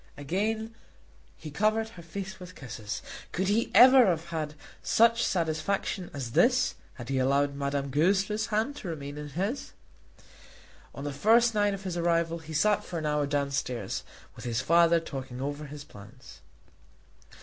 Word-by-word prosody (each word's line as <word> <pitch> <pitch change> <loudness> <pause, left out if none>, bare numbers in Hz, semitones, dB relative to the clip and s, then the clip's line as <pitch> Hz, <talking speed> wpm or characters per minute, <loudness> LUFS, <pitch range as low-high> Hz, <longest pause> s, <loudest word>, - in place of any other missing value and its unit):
Again 215 +9 -2 0.6
he 155 - -9
covered 215 +6 +1
her 180 -6 -12
face 190 +3 -7
with 180 0 -11
kisses. 115 -5 -6 0.3
Could 190 +2 -1
he 220 +3 +1
ever 255 -1 +9
have 170 -1 -1
had 155 -2 -3 0.3
such 230 +1 +4
satisfaction 175 +2 -1
as 135 -7 -5
this 250 - +3 0.2
had 120 -1 -9
he 135 -1 0
allowed 140 +2 +2
Madame 140 0 -2
Goesler's 195 +8 +1
hand 225 +6 0
to 195 - -7
remain 145 -3 -6
in 150 0 -6
his? 195 - -3 1.2
On 140 - -7
the 145 -1 -3
first 230 - +4
night 205 -1 +2
of 195 - -10
his 180 -2 -3
arrival 170 -1 +1
he 160 0 -11
sat 210 +7 +3
for 175 - -6
an 155 - -3
hour 150 -1 +1
downstairs 140 -4 -2 0.3
with - - -10
his 120 -2 -1
father 170 +3 +4
talking 135 -5 -7
over 145 +2 -4
his 145 0 -9
plans. 100 -6 -14
165 Hz, 160 wpm, -28 LUFS, 140-205 Hz, 1.2 s, ever